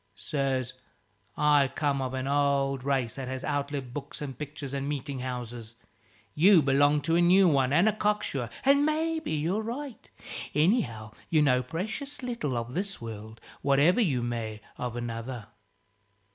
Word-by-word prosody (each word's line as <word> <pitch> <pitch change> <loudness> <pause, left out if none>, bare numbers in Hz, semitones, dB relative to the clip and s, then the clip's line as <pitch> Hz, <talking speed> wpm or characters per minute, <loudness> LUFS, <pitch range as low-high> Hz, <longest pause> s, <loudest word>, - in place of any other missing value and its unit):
Sirs, 135 -4 -2 0.6
I 145 -2 +4
come 140 -3 0
of 130 0 -3
an 130 0 -2
old 140 -2 +1
race 130 -4 0
that 135 -2 -4
has 130 0 -4
outlived 140 -3 -3
books 145 0 -6
and 140 -3 -5
pictures 145 0 -7
and 140 +1 -2
meeting 140 -1 -4
houses: 120 -2 -6 0.6
you 175 +1 +6
belong 145 +2 +3
to 165 +2 +1
a - - +4
new 185 +2 +6
one 135 -5 +3
and 170 +8 +4
a 215 - +3
cock 210 0 0
sure, 125 -5 -3 0.2
and 280 +1 +5
maybe 315 +1 0
you're 165 +8 0
right. 245 +3 -6 0.5
Anyhow, 140 - +1 0.2
you 155 -2 +4
know 125 -3 +3
precious 220 - -5
little 235 - -2
of 120 +1 -4
this 195 +2 -2
world, 110 -1 -8 0.2
whatever 145 - +4
you 135 - +1
may 115 -3 -4
of 125 -1 -4
another." 120 0 -5
140 Hz, 160 wpm, -28 LUFS, 125-170 Hz, 0.6 s, you